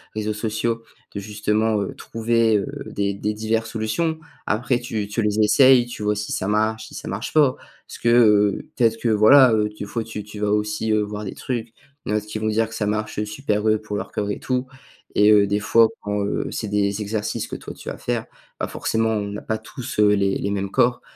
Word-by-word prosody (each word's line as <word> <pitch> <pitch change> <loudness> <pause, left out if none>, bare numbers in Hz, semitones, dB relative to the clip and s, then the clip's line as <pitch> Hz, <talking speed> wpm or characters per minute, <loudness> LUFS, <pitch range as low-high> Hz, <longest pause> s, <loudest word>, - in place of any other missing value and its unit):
réseaux 110 0 -1
sociaux 115 +2 -2 0.3
de 100 - -4
justement, 105 +1 0
heu, 100 - -4
trouver, 115 -1 +1
heu, 100 - -1 0.2
des 100 0 -2
des 105 +2 -2
diverses 110 +1 -1
solutions. 160 +9 -1 0.3
Après 120 +4 0
tu 110 -4 -3
tu 105 +3 -2
les 105 0 0
essayes 125 +3 +6
tu 120 - -7
vois 105 0 +1
si 105 +1 -4
ça 95 - -2
marche, 110 +1 0
si - - -15
ça - - -7
marche 105 +6 -4
pas. 145 -5 +4 0.3
Parce - - -9
que, 120 - 0
heu, 105 -4 +4
peut-être 115 -2 +2
que 115 - +1
voilà, 120 +5 +7
heu, 105 -1 +2
des 105 - -5
fois 115 +2 -3
tu 110 -2 -6
tu 105 0 -10
vas 105 0 0
aussi, 105 +1 0
heu, 110 0 +3
voir 105 0 -4
des 95 - -5
trucs, 120 -3 -4
heu, - - -37 0.3
il - - -6
y'en - - +2
a 105 - +3
d'autres 105 - -13
qui 110 - -3
vont 110 - -1
dire 110 +1 +1
que 110 - -9
ça 110 -2 -1
marche 105 0 -2
super, 105 -1 -2
heu, 110 0 +2
pour 105 -1 -5
leur - - -5
corps 105 -1 -2
et - - -4
tout 130 0 -2 0.5
et 105 +1 +6
heu, 100 -1 +5
des 100 +1 0
fois, 115 +2 +5 0.2
bon, 105 0 -1
heu, 100 - -2
c'est 110 - -4
des 100 0 0
exercices 105 0 -3
que - - -6
toi - - -8
tu - - -8
vas - - -6
faire, - - -2 0.3
bah, - - -1
forcément 110 0 -1
on 105 -2 0
n'a 105 - -6
pas 110 - -2
tous, 125 -3 -7
heu, 105 -1 +6
les 100 -1 +1
les 100 - -2
mêmes 100 -1 -2
corps 120 +4 +2
110 Hz, 240 wpm, -22 LUFS, 105-115 Hz, 0.5 s, voilà